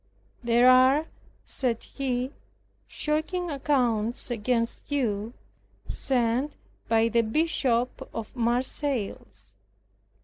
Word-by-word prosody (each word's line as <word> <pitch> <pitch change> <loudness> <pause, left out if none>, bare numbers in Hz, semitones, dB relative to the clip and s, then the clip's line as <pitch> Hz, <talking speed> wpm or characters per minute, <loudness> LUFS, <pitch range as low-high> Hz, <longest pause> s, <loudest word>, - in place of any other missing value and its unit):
"There 240 +1 +4
are," 260 +4 +6 0.4
said 240 -4 -2
he, 255 -1 -2 0.6
"shocking 315 +3 -2
accounts 245 -5 0
against 230 +4 -1
you, 230 -5 -1 0.5
sent 250 +2 0 0.4
by 225 0 +4
the 235 0 +3
Bishop 250 -1 0
of 225 -2 -6
Marseilles. 235 - -2
245 Hz, 80 wpm, -27 LUFS, 230-275 Hz, 0.6 s, are